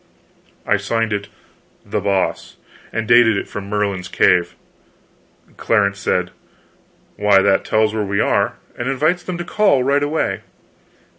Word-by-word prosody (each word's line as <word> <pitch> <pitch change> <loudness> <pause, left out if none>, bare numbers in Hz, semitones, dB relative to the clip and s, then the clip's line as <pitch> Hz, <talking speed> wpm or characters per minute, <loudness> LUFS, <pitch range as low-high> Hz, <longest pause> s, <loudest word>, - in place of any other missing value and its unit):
I 105 - +2
signed 110 +3 -1
it 100 0 -3 0.6
"The - - -2
Boss," 100 -2 -1 0.4
and 115 -1 -3
dated 120 -2 +5
it - - -4
from 100 -1 -7
Merlin's 100 -3 -2
Cave. 90 -1 +2 1.0
Clarence 100 -3 +1
said 90 -2 -1 0.9
"Why, 100 -1 +4
that 95 -1 +2
tells 110 0 +1
where 110 - -1
we 100 0 -2
are, - - +1 0.2
and 120 +2 -3
invites 155 +7 +1
them 180 -1 -5
to 175 - -4
call 180 -7 +2
right 140 +2 +2
away." 150 +2 -1
105 Hz, 140 wpm, -19 LUFS, 100-130 Hz, 1.0 s, dated